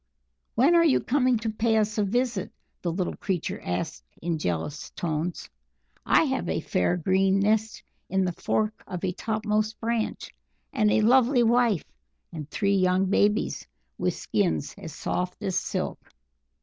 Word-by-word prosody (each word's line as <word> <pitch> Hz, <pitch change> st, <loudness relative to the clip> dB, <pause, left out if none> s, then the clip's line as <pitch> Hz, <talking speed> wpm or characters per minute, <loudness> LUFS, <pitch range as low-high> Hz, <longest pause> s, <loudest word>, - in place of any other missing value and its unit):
"When 270 Hz, +9 st, +5 dB
are 340 Hz, -1 st, +6 dB
you 315 Hz, -5 st, +4 dB
coming 255 Hz, -2 st, +2 dB
to 225 Hz, 0 st, -3 dB
pay 220 Hz, +1 st, +1 dB
us 215 Hz, 0 st, +1 dB
a -, -, +3 dB
visit?" 235 Hz, -1 st, -1 dB, 0.3 s
the 175 Hz, -, -1 dB
little 180 Hz, +1 st, -2 dB
creature 185 Hz, -4 st, -3 dB
asked 155 Hz, -, -3 dB, 0.2 s
in 165 Hz, -1 st, -2 dB
jealous 90 Hz, -, -3 dB
tones. 165 Hz, +1 st, -3 dB, 0.6 s
"I -, -, +5 dB
have -, -, -1 dB
a -, -, 0 dB
fair, 90 Hz, -, 0 dB
green 190 Hz, +3 st, +2 dB
nest 215 Hz, +2 st, +1 dB, 0.3 s
in 190 Hz, 0 st, +1 dB
the 180 Hz, -, 0 dB
fork 215 Hz, +5 st, -1 dB
of 180 Hz, 0 st, -6 dB
a 185 Hz, -, 0 dB
top 215 Hz, +3 st, -3 dB
most 215 Hz, 0 st, 0 dB
branch, 230 Hz, -1 st, -2 dB, 0.4 s
and 215 Hz, -6 st, +3 dB
a -, -, +3 dB
lovely 245 Hz, +2 st, +5 dB
wife 235 Hz, -5 st, +3 dB, 0.5 s
and 155 Hz, -2 st, -6 dB
three 200 Hz, +3 st, +1 dB
young 185 Hz, +1 st, +2 dB
babies, 210 Hz, +1 st, +1 dB, 0.3 s
with -, -, 0 dB
skins 180 Hz, -7 st, -1 dB
as 160 Hz, -, -8 dB
soft 180 Hz, +4 st, -3 dB
as 190 Hz, -, -1 dB
silk." -, -, -2 dB
205 Hz, 160 wpm, -26 LUFS, 180-225 Hz, 0.6 s, are